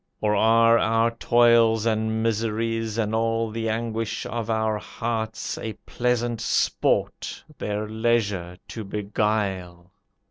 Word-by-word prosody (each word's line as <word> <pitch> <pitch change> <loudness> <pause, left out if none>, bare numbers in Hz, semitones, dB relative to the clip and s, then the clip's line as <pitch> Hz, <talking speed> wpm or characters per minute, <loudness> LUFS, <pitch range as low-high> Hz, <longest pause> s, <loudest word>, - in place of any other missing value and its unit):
Or 105 -1 +1
are 115 +2 +5
our 115 +1 +2
toils 115 -1 +4
and 110 0 0
miseries, 115 0 -1
And 110 -1 0
all 115 0 0
the 115 0 -2
anguish 110 -1 -2
of 115 -1 -4
our 110 -1 0
hearts, 110 0 -4
A 110 - -4
pleasant 120 -1 -1
sport, - - 0 0.2
their 105 +1 -2
leisure 105 -6 0
to 110 - -6
beguile? 100 -4 -2
110 Hz, 115 wpm, -24 LUFS, 105-115 Hz, 0.2 s, are